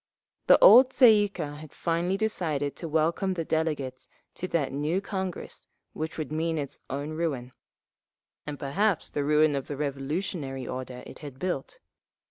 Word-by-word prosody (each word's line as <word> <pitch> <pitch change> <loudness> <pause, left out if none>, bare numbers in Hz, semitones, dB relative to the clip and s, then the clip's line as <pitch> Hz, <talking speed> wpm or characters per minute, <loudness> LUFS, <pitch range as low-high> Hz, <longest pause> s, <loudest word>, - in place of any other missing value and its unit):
The - - +8
old 260 - +9
Tsay 255 -3 +7
ee - - -5
kah 150 -6 -6
had 155 -1 -11
finally 175 +3 0
decided 160 -10 -1
to 170 - -5
welcome 165 +5 +1
the 165 -2 -3
delegates 150 -6 -2 0.3
to 185 - -5
that 165 -6 0
new 150 +6 0
Congress 190 -2 -5 0.3
which 160 +1 -5
would 155 -2 -4
mean 160 +1 -1
its 140 -2 -4
own 145 +3 -4
ruin—and 145 -1 -8
perhaps 180 +8 0
the 145 - -1
ruin 150 0 +3
of 135 - -3
the 145 - -5
revolutionary 140 -1 -3
order 125 -1 -6
it - - -11
had 145 -4 -9
built. 175 -3 -3
155 Hz, 155 wpm, -27 LUFS, 140-175 Hz, 0.3 s, old